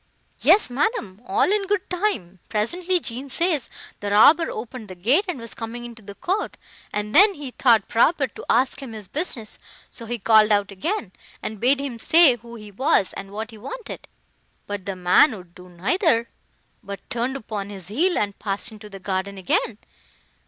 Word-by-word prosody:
"Yes, 410 - +5
madam, 245 - -1
all 415 +2 +2
in 410 -1 +1
good 405 -1 0
time. 345 - -2
Presently, 350 - 0
Jean 260 -1 -5
says, 330 -1 0 0.3
the 205 - -3
robber 295 +11 +6
opened 240 -2 -7
the 185 - -9
gate, 255 - +2
and 360 - -3
was 230 -1 -6
coming 235 +1 -6
into 235 -1 -10
the 200 -1 -10
court, 385 - -2 0.3
and 210 +1 -3
then 405 0 +7
he 285 -4 -7
thought 230 -5 +3
proper 275 +5 +3
to 250 - -10
ask 260 +3 +2
him 255 -4 -7
his 210 -3 -8
business: 260 - -5 0.3
so 230 - -10
he 240 +1 -2
called 215 0 +5
out 205 -1 +2
again, 210 - -3 0.3
and 215 -1 -5
bade 265 +5 +3
him 270 -4 -5
say 315 -2 +6
who 235 +1 -12
he 210 -2 -11
was, 200 -3 +2
and 195 - -7
what 215 +3 -6
he 220 - -12
wanted. 460 - -8 0.6
But 205 -2 -6
the 195 - -2
man 185 +8 +4
would 180 -2 -14
do 180 0 -14
neither; 230 - +1 0.5
but 200 -1 -9
turned 240 +3 -1
upon 210 -5 -5
his 190 -3 -9
heel, 335 - +1
and 200 -1 -2
passed 205 +3 -1
into 215 -1 -11
the 195 -1 -10
garden 190 +1 -3
again. 320 - 0
230 Hz, 185 wpm, -23 LUFS, 205-295 Hz, 0.6 s, then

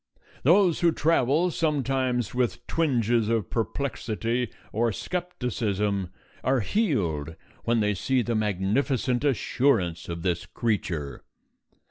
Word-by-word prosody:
Those 175 +3 +4
who 170 -1 +4
travel 160 +2 +2
sometimes 135 - 0
with 125 -1 -1
twinges 120 -8 +1
of 115 -3 0
perplexity 120 -1 -2 0.2
or 115 +2 +2
skepticism 105 - -2 0.3
are 130 -1 +2
healed 90 - 0 0.3
when 115 -1 +2
they 105 0 +2
see 125 +6 +1
the 120 - -1
magnificent 110 +5 0
assurance 115 - +1
of 85 -1 -5
this 90 -2 -1
creature. 90 - -2
120 Hz, 105 wpm, -26 LUFS, 105-140 Hz, 0.3 s, Those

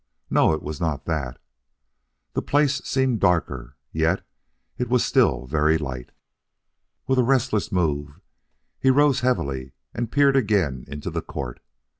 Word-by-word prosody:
No, - - +4
it 80 - -2
was 75 +1 -6
not 80 -4 -1
that. 70 -7 -2 1.0
The - - 0
place 140 -1 +2
seemed 130 -4 +1
darker, 75 -9 0 0.2
yet 80 +4 0 0.5
it 125 -1 -1
was 125 -1 +3
still 65 0 +2
very 75 +3 +2
light. 65 -5 -6 1.0
With 130 -1 +2
a - - +5
restless 120 -4 +1
move, 75 -6 -1 0.6
he 130 - +3
rose 140 0 +4
heavily 70 - -1 0.2
and 120 -1 -3
peered 140 -1 +4
again 95 - +1
into 75 +1 -6
the - - -2
court. 65 -3 -6
85 Hz, 140 wpm, -24 LUFS, -, 1.0 s, a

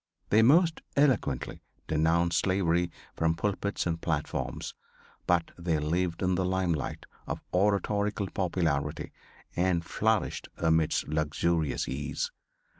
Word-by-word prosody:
They 110 - +6
most 160 +7 +5
eloquently 130 - +1 0.3
denounced 80 +1 +2
slavery 90 -2 +1 0.3
from 80 0 +1
pulpits 100 +2 -1
and 85 -1 -1
platforms; 80 -3 -2 0.5
but 85 -1 +2
they 85 -2 +1
lived 85 +4 -1
in 90 0 +2
the 90 +1 +1
limelight 90 -4 -1 0.2
of - - -3
oratorical 100 +2 +1
popularity 85 -6 -1 0.4
and 85 -2 +1
flourished 110 +4 0
amidst 80 -1 +2
luxurious 80 +1 0
ease. 70 +1 -3
85 Hz, 110 wpm, -29 LUFS, 80-95 Hz, 0.5 s, They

